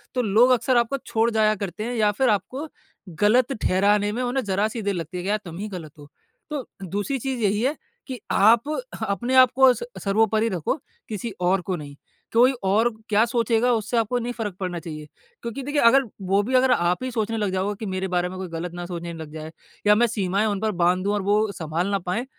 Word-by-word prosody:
तो 250 - +2
लोग 230 +3 +4
अक्सर 255 +1 +3
आपको 240 +3 +1
छोड़ 230 0 +1
जाया 215 -1 +3
करते 200 0 -5
हैं, 240 +2 -3
या 215 -2 +3
फिर 250 +5 +1
आपको 255 - -1 0.5
गलत 240 +5 +4
ठहराने 205 +2 +2
में 235 +4 -3
उन्हें 255 +2 -1
ज़रा 200 +2 +1
सी 225 +1 -5
देर 200 -1 -1
लगती 170 0 -5
है 180 - -4
कि 190 - -3
यार 210 +1 +1
तुम 170 -1 -8
ही 205 +3 -4
गलत 170 -6 -8
हो। 145 - -12 0.4
तो 290 -4 -4 0.2
दूसरी 205 - -2
चीज़ 260 0 -3
यही 205 0 +1
है 270 +5 +1 0.3
कि 260 -3 -6
आप 230 +7 +4 0.3
अपने 235 +7 -1
आपको 260 0 +6
स - - -6 0.2
सर्वोपरि 220 +2 +2
रखो 180 - -1 0.3
किसी 220 +2 -4
और 180 +1 +2
को 185 +1 -3
नहीं। 145 -3 -9 0.4
कोई 245 +3 +6
और 210 +5 +3 0.2
क्या 210 +1 +4
सोचेगा 235 0 +1
उससे 225 +1 -1
आपको 230 +2 +1
नहीं 240 +1 -3
फ़र्क 215 -6 -4
पड़ना 180 -2 -3
चाहिए। 155 -3 -8 0.3
क्योंकि 235 +4 -5
देखिए 290 +2 0
अगल 265 +4 +6 0.2
वो 195 +2 +3
भी 250 +5 -4
अगर 255 0 +4
आप 180 -1 +1
ही 255 - -3
सोचने 225 -1 -2
लग 205 -3 -1
जाओगे 190 +2 -1
कि 220 - -5
मेरे 185 0 -2
बारे 180 -1 0
में 185 - -8
कोई 190 - -4
गलत 165 +1 -5
ना 175 0 -6
सोचने 170 -1 -6
लग 160 -2 -8
जाए 155 0 -7 0.4
या 210 - +7
मैं 240 +3 +3
सीमाएँ 200 -2 0
उन 205 -2 -1
पर 220 0 +1
बांध 180 +1 +2
दूँ 200 +1 0
और 205 - 0
वो 205 +2 +1
संभाल 165 0 -3
ना 200 0 0
पाएँ। 185 +7 -3
210 Hz, 230 wpm, -24 LUFS, 185-235 Hz, 0.5 s, या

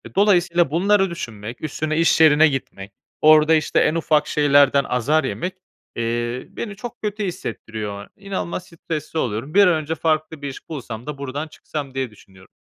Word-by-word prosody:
Dolayısıyla 175 -5 +3
bunları 195 +4 +3
düşünmek, 115 -8 -7
üstüne 155 +1 -2
iş 165 -1 +3
yerine 155 0 +7
gitmek, 115 -8 -5 0.3
orada, 155 +1 +6
işte, 155 -1 +1
en 155 - +2
ufak 155 -2 +2
şeylerden 145 -2 +4
azar 145 +5 +1
yemek, 175 +7 -3 0.4
eee, 120 +1 -2
beni 205 -3 -6
çok 240 +3 -9
kötü 210 0 -3
hissettiriyor. 110 - -6
İnanılmaz 195 -3 -5
stresli 160 -1 -5
oluyorum. 120 +3 -3
Bir 200 0 +6
an 180 - +4
önce 160 0 -2
farklı 155 -1 -1
bir 145 - -4
iş 135 - -11
bulsam 120 -7 -6
da 150 -2 -5
buradan 140 +3 -4
çıksam 145 -2 -7
diye 130 -3 -3
düşünüyorum. 95 -3 -19
150 Hz, 160 wpm, -21 LUFS, 130-170 Hz, 0.4 s, yerine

